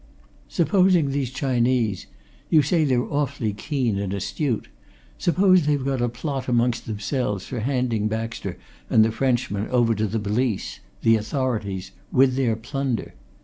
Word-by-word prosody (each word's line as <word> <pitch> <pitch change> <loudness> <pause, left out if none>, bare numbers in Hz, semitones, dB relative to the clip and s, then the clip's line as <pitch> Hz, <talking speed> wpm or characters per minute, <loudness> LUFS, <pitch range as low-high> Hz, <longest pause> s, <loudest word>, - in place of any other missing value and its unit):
"Supposing 175 -2 +3
these 135 -2 -1
Chinese 125 -5 0 0.4
you 155 -3 +5
say 160 +2 +2
they're 125 -3 +2
awfully 140 -7 -1
keen 120 -3 -1
and 100 -1 -2
astute 115 - -2 0.5
supposing 185 -2 +4
they've 145 -3 +1
got 135 -2 0
a 120 - +1
plot 130 +3 -4
amongst 120 -1 +1
themselves 105 -1 -2
for 125 - -5
handing 120 -3 0
Baxter 115 +1 -4 0.3
and 110 - +5
the 110 - 0
Frenchman 115 -4 0
over 120 -2 +2
to 110 0 0
the 110 - -2
police 105 +1 -1 0.2
the 115 0 +5
authorities 110 -6 -2 0.2
with 130 0 +4
their 125 -4 +1
plunder? 125 0 -3
125 Hz, 145 wpm, -24 LUFS, 110-140 Hz, 0.5 s, you